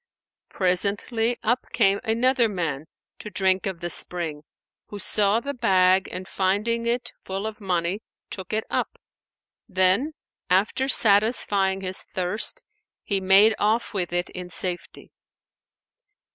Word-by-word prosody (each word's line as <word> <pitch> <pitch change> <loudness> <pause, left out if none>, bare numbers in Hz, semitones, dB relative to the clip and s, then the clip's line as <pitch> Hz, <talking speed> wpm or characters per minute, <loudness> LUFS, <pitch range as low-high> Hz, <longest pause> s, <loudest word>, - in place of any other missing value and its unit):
Presently 205 +6 0
up 240 +3 0
came 200 -3 +3
another 240 +1 +2
man 160 -6 -3 0.3
to 210 - -8
drink 190 0 +1
of 185 -3 -5
the 175 0 -3
spring, 165 -4 0 0.5
who 205 - -8
saw 205 +1 +2
the 280 +4 -5
bag 190 -6 +3
and 185 +1 -7
finding 215 +5 -1
it 240 +1 -1
full 195 +2 -5
of 220 0 -6
money 180 +1 -1 0.3
took 190 -3 -6
it 220 0 0
up; - - -3 0.7
then, 190 +10 +2 0.4
after 205 +8 +1
satisfying 205 -4 +3
his 185 0 +1
thirst, 205 - -3 0.4
he 200 -2 -1
made 195 +4 +6
off 220 +3 0
with 180 -4 -2
it 175 +1 -2
in 180 -1 -7
safety. 180 0 -5
195 Hz, 130 wpm, -24 LUFS, 185-225 Hz, 0.7 s, made